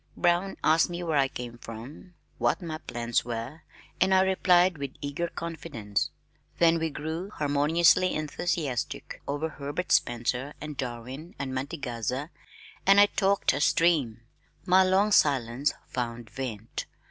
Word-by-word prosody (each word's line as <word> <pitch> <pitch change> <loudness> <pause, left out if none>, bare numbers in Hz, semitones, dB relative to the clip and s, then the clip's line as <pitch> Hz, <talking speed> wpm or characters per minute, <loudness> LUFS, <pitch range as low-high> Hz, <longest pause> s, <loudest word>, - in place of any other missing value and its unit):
Brown 175 +2 +1
asked 160 +2 +4
me 175 0 -4
where 160 -4 +1
I 135 - +4
came 120 -2 -7
from, 120 - -10 0.2
what - - +2
my 160 -4 -5
plans 120 -4 -1
were, 120 +6 -5 0.4
and 190 +1 +5
I 190 - +6
replied 185 -3 +3
with 140 -1 -5
eager 145 +4 -3
confidence. 160 -12 -3 0.5
Then 165 -1 +4
we 160 0 0
grew 160 +5 -5
harmoniously 155 +3 +3
enthusiastic 155 -3 -3
over 145 +3 -1
Herbert 145 +3 -5
Spencer 125 +4 +1
and 150 0 -6
Darwin 130 - -6
and 135 -2 -4
Mantegazza 130 0 -3 0.5
and 195 +1 +6
I 205 - +9
talked 200 -4 +2
a 145 - -2
stream. 150 -9 +2 0.4
My 185 0 +6
long 190 +3 +3
silence 135 - +3
found 120 -2 -5
vent. 115 -5 -5
150 Hz, 135 wpm, -28 LUFS, 125-175 Hz, 0.5 s, I